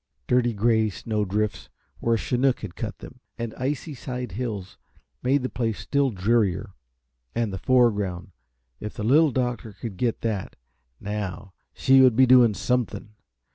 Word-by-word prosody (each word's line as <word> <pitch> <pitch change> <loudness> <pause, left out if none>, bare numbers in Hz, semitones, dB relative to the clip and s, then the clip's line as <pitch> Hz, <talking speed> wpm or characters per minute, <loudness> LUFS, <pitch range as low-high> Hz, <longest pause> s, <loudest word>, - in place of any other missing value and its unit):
Dirty 125 -1 +2
gray 110 +1 +2
snow 105 +4 -2
drifts, 105 0 -2 0.3
where 115 0 +2
a - - +1
chinook 125 +3 +1
had 105 -5 -7
cut - - -5
them, - - -12 0.2
and 115 -1 -4
icy 145 +4 -3
side 125 -3 -5
hills 105 -3 -5 0.4
made 130 +2 +2
the - - 0
place 115 -2 -2
still 140 -1 +1
drearier. 100 -3 0 0.6
And 115 -4 -1
the 95 - -4
foreground 105 -8 +1 0.5
if 105 - -6
the - - -4
Little 150 +8 +5
Doctor 125 -4 -2
could 100 -1 -7
get 120 +1 -1
that, 105 -4 -3 0.4
now, 100 -2 -5 0.2
she 135 0 +5
would 130 -3 +6
be 130 +2 +6
doing 120 -4 +6
something! 120 0 -2
115 Hz, 155 wpm, -25 LUFS, 105-125 Hz, 0.6 s, would